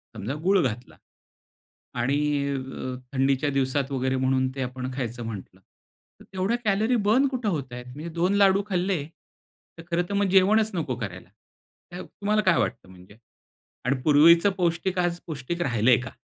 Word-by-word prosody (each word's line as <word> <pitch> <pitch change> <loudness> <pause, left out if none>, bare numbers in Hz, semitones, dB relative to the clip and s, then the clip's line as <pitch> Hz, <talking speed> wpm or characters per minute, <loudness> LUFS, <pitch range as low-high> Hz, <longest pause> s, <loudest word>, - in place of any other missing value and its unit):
समजा 110 +5 -4
गूळ 195 0 +4
घातला. 120 0 -4 1.0
आणि 135 +4 +1 0.4
अ, 130 -1 -5 0.2
थंडीच्या 135 +2 +1
दिवसात 135 0 0
वगैरे 130 0 0
म्हणून 130 0 +1
ते 135 - -4
आपण 130 +1 -5
खायचं 120 -2 -4
म्हटलं 100 -4 -8 0.6
तर - - -14
तेवढ्या 190 +5 0
कॅलरी 215 +4 +2
बर्न 255 +6 +4
कुठे 255 -4 -3
होतायेत? 125 -7 -4
म्हणजे 155 +4 -6
दोन 175 +3 +1
लाडू 200 0 +4
खाल्ले 180 -4 0 0.7
तर 165 - -10
खरं 175 +1 +2
तर - - -3
मग 200 0 +2
जेवणच 210 +4 +4
नको 150 -8 -2
करायला. 95 -6 -7 0.7
तुम्हाला 210 +1 -1
काय 185 -4 +3
वाटतं 105 - -2
म्हणजे 95 +3 -16 0.7
आणि 135 +2 +1
पूर्वीच 160 +5 +6
पौष्टिक 180 +1 0
आज 175 -1 0
पौष्टिक 160 +2 -5
राहिलंय 120 -2 +3
का? 120 -2 -7
145 Hz, 150 wpm, -25 LUFS, 125-185 Hz, 1.0 s, पूर्वीच